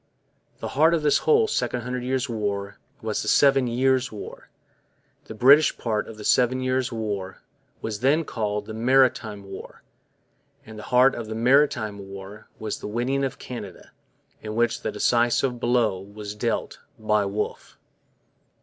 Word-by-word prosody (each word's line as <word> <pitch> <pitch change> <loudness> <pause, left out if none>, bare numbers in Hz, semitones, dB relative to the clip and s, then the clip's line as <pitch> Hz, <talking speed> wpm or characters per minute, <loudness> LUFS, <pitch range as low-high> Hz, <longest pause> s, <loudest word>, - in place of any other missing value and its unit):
The - - -4
heart 160 +4 +4
of 160 - -2
this 150 - +3
whole 445 -1 +5
Second 125 - -1
Hundred 125 +1 -4
Years' 130 +2 -1
War 100 -4 -3 0.2
was 110 -1 -2
the - - -6
Seven 135 -2 +4
Years' 130 +2 +1
War; 105 - -9 0.8
the 110 - -9
British 140 +7 +5
part 110 -3 -2
of 110 - -10
the 105 - -9
Seven 125 +3 +3
Years' 130 0 -1
War 100 -4 -4 0.4
was 105 -2 -3
then 145 +6 +2
called 105 -4 -3
the 110 - -7
'Maritime 115 -3 +2
War'; 95 0 -10 0.8
and 110 -1 -10
the - - -10
heart 125 +2 +5
of 115 -2 -6
the 110 - -5
'Maritime 120 -4 +2
War' 100 +2 -10
was 110 -1 -4
the - - -6
winning 125 +6 -1
of 135 - -2
Canada, 105 -8 -9 0.5
in 110 0 -6
which 120 0 +1
the - - -2
decisive 120 +1 +1
blow 115 -6 +1
was 100 +1 -8
dealt 115 +2 -3 0.2
by 105 -1 +1
Wolfe. 100 +2 -4
115 Hz, 160 wpm, -24 LUFS, 105-130 Hz, 0.8 s, whole